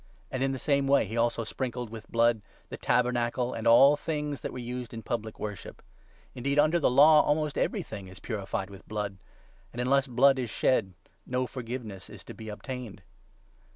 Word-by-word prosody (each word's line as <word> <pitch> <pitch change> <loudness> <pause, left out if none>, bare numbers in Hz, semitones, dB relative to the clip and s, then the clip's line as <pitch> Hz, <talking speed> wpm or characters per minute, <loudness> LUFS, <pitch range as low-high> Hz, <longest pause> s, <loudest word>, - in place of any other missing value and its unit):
And 130 - -3
in 135 0 +1
the 135 - -3
same 140 +1 +1
way 140 -3 +4
he 110 +3 -6
also 115 0 +1
sprinkled 120 0 -4
with 115 -1 -8
the - - -33
21 - - -24 0.3
blood - - -19 0.3
the - - -6
Tabernacle 125 0 +1
and 115 +1 -3
all 135 +5 +7
the - - -17
things 150 -3 -3
that - - -4
were - - -8
used 125 -1 -6
in 115 - -7
public 110 -1 -4
worship. 105 -2 -7 0.5
Indeed, 140 +3 -2
under 155 +4 +4
the - - +3
Law, 150 +4 +7
almost 150 0 0
everything 100 -3 -3
is 95 - -12
22 - - -27
purified 100 -3 -3
with 100 - -13
blood; 105 -2 -4 0.5
and, 120 - -8
unless 135 +2 +2
blood 135 +2 +4
is 125 -3 -2
shed, 105 -5 +1 0.3
no 125 0 0
forgiveness 120 -6 -7
is - - -11
to - - -10
be 110 -1 -9
obtained. 110 -2 -7
125 Hz, 200 wpm, -28 LUFS, 110-135 Hz, 0.5 s, all